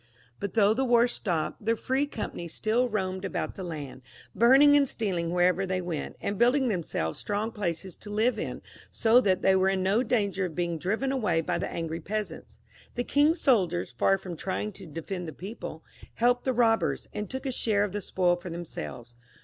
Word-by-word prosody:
But 200 0 -4
though 210 -1 +5
the 260 +4 0
war 240 -1 +4
stopped, 175 -7 -3
the 225 +2 +2
free 265 +5 0
companies 170 - -5
still 235 +3 +1
roamed 190 -3 -2
about 195 - -3
the 190 - -7
land, 145 -7 -6 0.3
burning 270 +5 +6
and 280 -2 +4
stealing 180 -7 -1
wherever 180 +1 +2
they 185 -1 -1
went, 175 -4 -4
and 200 -1 -3
building 250 +2 +4
themselves 160 - -2
strong 210 +2 -2
places 185 -4 -3
to 210 - -9
live 220 +4 +1
in, - - -5 0.3
so 230 +2 +4
that 190 -5 +1
they 190 0 +5
were 190 0 +3
in 190 -1 0
no 200 +5 +3
danger 200 -6 0
of 165 -4 -6
being 170 -2 -1
driven 220 - -1
away 210 -11 +1
by 170 +1 -1
the - - -3
angry 165 0 -3
peasants. 210 +5 -5 0.4
The 245 - -1
king's 300 +6 +2
soldiers, 185 -10 +2
far 195 - +2
from 180 -2 -7
trying 195 +5 -3
to 190 -2 -12
defend 170 +3 -5
the 160 - -6
people, 185 - -8 0.3
helped 245 +1 +2
the 260 - +2
robbers, 225 -2 +2
and 210 -1 -4
took 265 +1 -5
a 265 - 0
share 215 -4 +1
of 205 - -2
the 205 +1 -3
spoil 180 -1 +1
for 175 +1 -8
themselves. 120 - -7
200 Hz, 200 wpm, -28 LUFS, 175-235 Hz, 0.4 s, burning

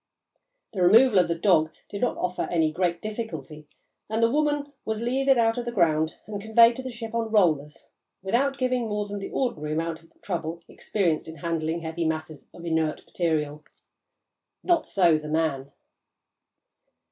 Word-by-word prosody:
The 190 - -2
removal 215 +4 +6
of 175 - +3
the 170 - 0
"dog" 165 -3 +3 0.2
did 200 - -7
not 245 - 0
offer 180 0 -2
any 160 -3 +2
great 170 0 -1
difficulty, 160 - -6 0.4
and 220 +1 0
the 230 - +4
"woman" 290 0 0
was 220 +1 -3
levered 270 +2 +2
out 230 0 +2
of 240 - -4
the 240 - -3
ground 160 -6 +2
and 205 -1 -6
conveyed 230 +2 +5
to - - -4
the 260 - -6
ship 230 -2 -7
on 230 -1 -1
rollers 155 -9 +1 0.4
without 270 +8 +1
giving 255 -3 0
more 210 0 -1
than 205 0 -5
the 195 - -6
ordinary 155 - -2
amount 165 0 -2
of 165 0 -23
trouble 170 -2 -4
experienced 175 -7 -1
in 160 - -8
handling 165 +1 -2
heavy 165 0 -2
masses 155 -2 -5
of 170 - -11
inert 160 -2 -1
material. 150 -3 -2 1.0
Not 345 -3 +2
so 175 -6 +3
the 150 - -8
"man." 150 -4 -1
180 Hz, 170 wpm, -26 LUFS, 160-230 Hz, 1.0 s, removal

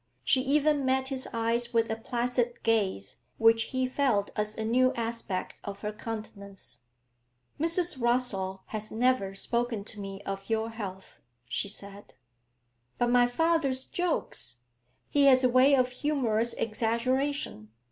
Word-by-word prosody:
She 260 - +3
even 290 +1 +2
met 265 0 +1
his 265 -2 -1
eyes 235 +1 -1
with 230 -1 +2
a - - 0
placid 240 +1 -1
gaze 200 - 0 0.2
which 225 0 +5
he 260 +1 -1
felt 255 -6 +1
as 210 0 -2
a 220 - -2
new 255 +3 +3
aspect 230 -5 -4
of 200 -1 -7
her 210 0 -3
countenance. 205 - -8 0.7
'Mrs. 335 -1 +1
Rossall 205 -6 0
has 215 0 -5
never 225 -4 +1
spoken 235 0 0
to 210 0 -7
me 195 0 -7
of 195 +1 -5
your 225 0 0
health,' 195 -4 -8 0.3
she 200 - -2
said. 200 0 -11 0.8
'But 240 0 +1
my 245 0 +5
father's 275 -1 +1
jokes; 215 - -2 0.5
he 285 -1 +4
has 260 -1 +6
a 255 - +5
way 255 +3 +6
of 255 -1 +2
humorous 250 -5 0
exaggeration. 230 - -1
235 Hz, 140 wpm, -29 LUFS, 210-260 Hz, 0.8 s, has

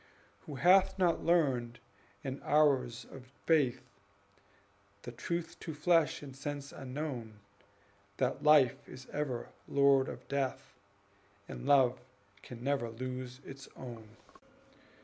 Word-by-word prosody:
Who 150 - -6
hath 185 +8 +5
not 175 -3 +2
learned, 130 -9 +2 0.5
in 135 0 -5
hours 140 -6 +2
of 130 -1 -11 0.2
faith, 130 -6 +2 1.2
The 120 - -6
truth 170 +6 -4
to 160 -3 -6
flesh 165 0 +2
and 135 -2 -9
sense 140 0 -5
unknown, 130 -5 -6 0.8
That 130 -1 0
Life 145 -3 +4
is 130 0 -10
ever 140 -5 -3 0.2
lord 140 -1 +4
of - - -9
Death, 135 -1 -3 0.7
And - - -7
Love 130 -3 +4 0.4
can 120 -1 -10
never 135 -4 0
lose 125 +2 -6
its 135 0 -10
own! 115 -3 -10
135 Hz, 115 wpm, -32 LUFS, 125-150 Hz, 1.2 s, hath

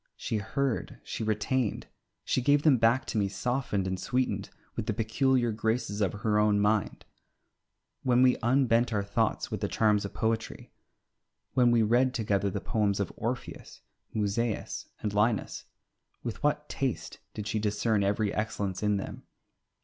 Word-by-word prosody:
She 110 - -2
heard, 125 +4 -2
she - - -4
retained, 110 +2 0 0.4
she 130 - +1
gave 145 +3 +3
them 150 -5 +6
back 115 +3 +3
to 110 - -1
me 100 - +2
softened 120 -3 -1
and 95 0 -2
sweetened 125 +6 -1 0.3
with 105 - -3
the 110 - 0
peculiar 120 +2 +2
graces 110 -1 -1
of 100 - +2
her 105 0 +1
own 105 -1 +3
mind. 105 0 0 1.0
When 125 0 +4
we 125 -1 +5
unbent 120 -1 +3
our 105 -2 0
thoughts 110 +2 -1
with 105 -2 -3
the 100 - 0
charms 105 -1 +2
of 100 - -5
poetry, 110 0 -2 0.8
when 125 -2 +4
we 120 -1 +4
read 125 +4 +3
together 100 -3 +1
the - - -3
poems 105 -4 0
of 100 - -2
Orpheus, 120 +3 -5 0.3
Musaeus, 110 +1 -2 0.2
and 105 -1 -1
Linus, 105 +1 0 0.6
with 115 -3 -5
what 150 0 0
taste 135 -3 -3 0.2
did 105 - -4
she 110 - -1
discern 105 0 +1
every 100 +1 +1
excellence 100 -3 -2
in 105 -1 +2
them! 95 - -6
110 Hz, 155 wpm, -29 LUFS, 105-125 Hz, 1.0 s, them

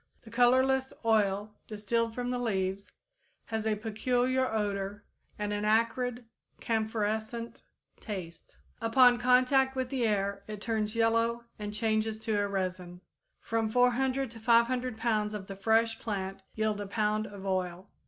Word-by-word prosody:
The 225 - -13
colorless 260 +2 +3
oil 210 -2 +2
distilled 225 +2 -1
from 245 0 -2
the 250 - -1
leaves 195 -3 -2 0.5
has 220 -1 -3
a 215 - +2
peculiar 245 +4 0
odor 205 -1 -2 0.3
and 210 0 -2
an 205 0 -2
acrid, 230 +3 +1 0.3
camphorescent 220 +1 -2 0.4
taste. 180 -6 -8 0.2
Upon 245 +1 +5
contact 255 +2 +4
with 260 -1 -2
the 255 -4 0
air 200 -1 0
it 210 -1 -6
turns 220 -1 -2
yellow 230 +1 +2 0.2
and 210 0 -4
changes 220 0 0
to 220 - -1
a 205 - +1
resin. 185 -2 -4 0.4
From 225 -1 -1
400 250 +2 +2
to 230 - -11
500 235 +1 +2
pounds 215 -2 0
of 200 -2 -6
the 195 - -7
fresh 225 +3 +2
plant 195 -3 -4
yield 215 -1 0
a 205 - -5
pound 215 +1 0
of 200 -1 -10
oil. 185 -1 -2
220 Hz, 145 wpm, -30 LUFS, 205-240 Hz, 0.5 s, Upon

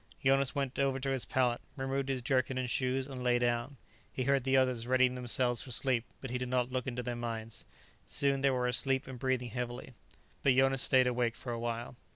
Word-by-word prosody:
Jonas 135 +1 +3
went 135 -2 -2
over 135 -1 +1
to 135 +1 -1
his 130 -2 -1
pallet, 125 -2 +1 0.2
removed 135 0 -2
his 130 -2 -1
jerkin 130 0 +1
and 130 -1 -1
shoes, 130 +2 0
and 130 -2 -7
lay 125 -1 +3
down. 120 +3 -1 0.3
He 130 - -3
heard 135 -1 +1
the 135 0 +3
others 125 -3 +1
readying 130 0 +3
themselves 125 -1 0
for 135 - -9
sleep, 125 -1 +2 0.2
but 135 - -6
he 125 - -2
did 125 0 -3
not 125 0 0
look 130 +1 -2
into 125 -1 -3
their 120 -1 -3
minds. 115 -1 -5 0.4
Soon 140 -1 +1
they 140 - +4
were 125 -1 0
asleep 130 +2 +2
and 130 -2 -8
breathing 130 -2 -1
heavily. 125 +1 -5 0.5
But 135 -2 +3
Jonas 135 0 +3
stayed 130 -1 +5
awake 120 -2 0
for 120 - -6
a 115 - -3
while. 120 +1 -4
130 Hz, 215 wpm, -32 LUFS, 120-135 Hz, 0.5 s, stayed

